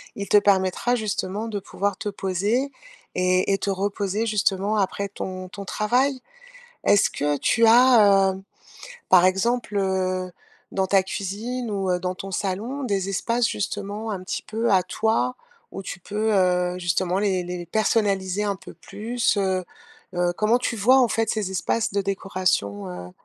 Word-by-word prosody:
il 200 0 -5
te 205 - +5
permettra, 200 +4 +2
justement, 210 -1 -3
de 210 -2 -3
pouvoir 200 +1 -3
te 210 - -3
poser 205 +8 -1 0.4
et 185 +1 +2
et 195 - 0
te - - -2
reposer 200 +2 -1
justement 205 -1 +1
après 200 0 -1
ton 185 -2 -6
ton 200 +1 -8
travail. 255 +8 +1 0.7
Est-ce 205 - +4
que 145 0 -1
tu 225 +10 +3
as, 220 -5 +6
heu, 190 0 -9 0.7
par 185 -1 +7
exemple, 210 +4 0
heu, 185 -1 -1 0.4
dans 190 -1 0
ta 195 -1 +4
cuisine 220 +6 -4
ou 195 -3 -1
heu, 180 - +1
dans 180 0 -3
ton 195 +1 -7
salon, 210 +10 -3
des 195 -4 -1
espaces 230 +4 0
justement 205 +2 -4
un 190 -3 -5
petit 185 - -4
peu 225 +1 -1
à 190 -2 +5
toi, 225 +5 0 0.4
où 195 - -7
tu 190 - -6
peux, 215 +4 -1
heu, 180 -2 +2
justement 180 +1 0
les 190 -3 0
les 175 0 -5
personnaliser 200 -1 +1
un 200 -1 -1
peu 190 - -12
plus, 225 +2 -2
heu 190 -2 0 0.5
heu, 175 0 +1
comment 215 +3 +3
tu 245 -1 -2
vois, 245 +6 +5
en 250 - +4
fait, 225 0 0
ces 210 -4 -1
espaces 190 +4 -1
de 200 0 0
décoration? 185 - -1
Heu, 90 0 -8
200 Hz, 165 wpm, -24 LUFS, 185-215 Hz, 0.7 s, par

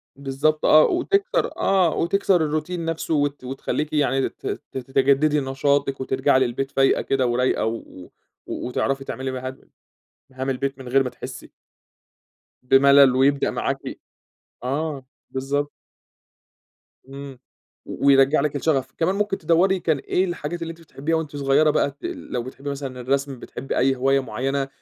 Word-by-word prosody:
بالضبط 140 +3 0
آه، 155 0 +7
وتكسر 400 +7 +1
آه، 185 -4 +2
وتكسر 195 +2 +2
الروتين 160 +3 -3
نفسه 165 0 -2
وت 145 -2 0
وتخليكِ 135 +4 -3
يعني 135 -3 +1
ت - - -19
ت - - -6
تتجددي 140 +3 +2
نشاطِك 135 0 0
وترجعي 130 0 +2
للبيت 130 +2 -1
فايقة 135 -1 +3
كده 130 -2 0
ورايقة، 125 +2 +1
و 110 +1 -1 0.7
و - - -4
وتعرفي 135 +2 -1
تعملي 130 0 -4
مهام 130 +1 -6 0.7
مهام 130 +1 -3
البيت 135 +1 -2
من 130 - -9
غير 135 +2 +4
ما 125 - -4
تحسي - - -9 1.1
بملل، 135 0 +6
ويبدأ 140 +1 +2
معاكِ - - -1 0.9
آه 140 0 -3 0.2
بالضبط. 140 +2 -2 1.4
إمم 135 -1 -9 0.5
و - - -5
ويرجع 135 +1 +5
لِك 150 0 -1
الشغف. 135 -3 0
كمان 175 +4 +1
ممكن 205 -1 0
تدوري 175 +4 +2
كان 160 -4 +1
إيه 180 +7 0
الحاجات 175 -1 -4
اللي 165 0 -4
أنتِ 165 - -14
بتحبيها 160 +1 -3
وأنتِ 155 -2 -3
صغيّرة 140 +2 +3
بقى 140 - +1
ت 140 - -30
ال - - -6
لو 120 - -2
بتحبي 135 +3 -7
مثلًا 135 -3 -5
الرسم 135 +1 -1
بتحبي 135 - -5
أي 135 +1 +3
هواية 135 +2 +2
معيّنة 135 +3 -2
140 Hz, 150 wpm, -23 LUFS, 130-155 Hz, 1.4 s, آه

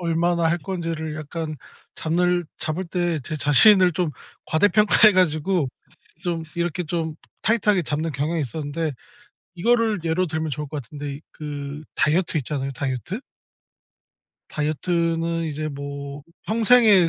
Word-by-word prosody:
얼마나 170 0 +1
할 170 - +1
건지를 165 -4 -4
약간 155 0 -5 0.4
잡늘 175 +2 +1
잡을 170 +4 -2
때 170 -2 -1
제 155 - -3
자신을 180 +5 +6
좀 175 -1 0 0.4
과대평가 205 +5 +5
해 210 - +8
가지고 175 -2 +2 0.5
좀 170 -2 -1
이렇게 170 0 -1
좀 160 -1 -2 0.3
타이트하게 210 -4 +3
잡는 155 +1 -1
경향이 155 +5 -1
있었는데 150 +2 -2 0.6
이거를 225 +1 +2
예로 170 +3 +1
들면 160 0 -2
좋을 150 +2 -3
것 150 -1 -4
같은데 145 +3 -7
그 145 -1 -6
다이어트 160 +1 +2
있잖아요. 135 0 -3
다이어트? 135 - -3 1.3
다이어트는 165 +2 0
이제 155 0 -3
뭐 140 0 -6 0.2
평생의 220 -4 +6
165 Hz, 290 characters per minute, -23 LUFS, 150-180 Hz, 1.3 s, 해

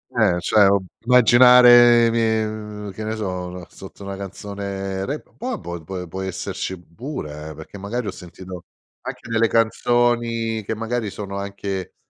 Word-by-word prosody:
Eh. 115 -2 +4
Ehm, 90 -3 +2
cioè, 100 +3 +4
ob 100 -1 +1 0.2
immaginare 120 -1 +7
i - - +1
mie 110 -1 +1
uhm, 105 -1 -7
che 110 +3 -7
ne 110 +1 -3
so, 90 -4 -4
la 90 -1 -9
sotto 95 +1 -12
una 100 0 -5
canzone 100 0 -5
rap, 145 +2 -6
po 245 - -6
abbo 85 - -5
pe 90 +2 -6
può 95 +3 -6
esserci 95 0 -4
pure, 85 - -8
eh, 75 - -10
perché 80 +6 -11
magari 105 +4 -4
ho - - -2
sentito 90 0 -10 0.4
anche - - -8
nelle 115 0 +2
canzoni 115 0 +1
che 110 - -3
magari 115 0 -3
sono 100 0 -6
anche, 100 -1 -5
100 Hz, 170 wpm, -21 LUFS, 95-115 Hz, 0.4 s, immaginare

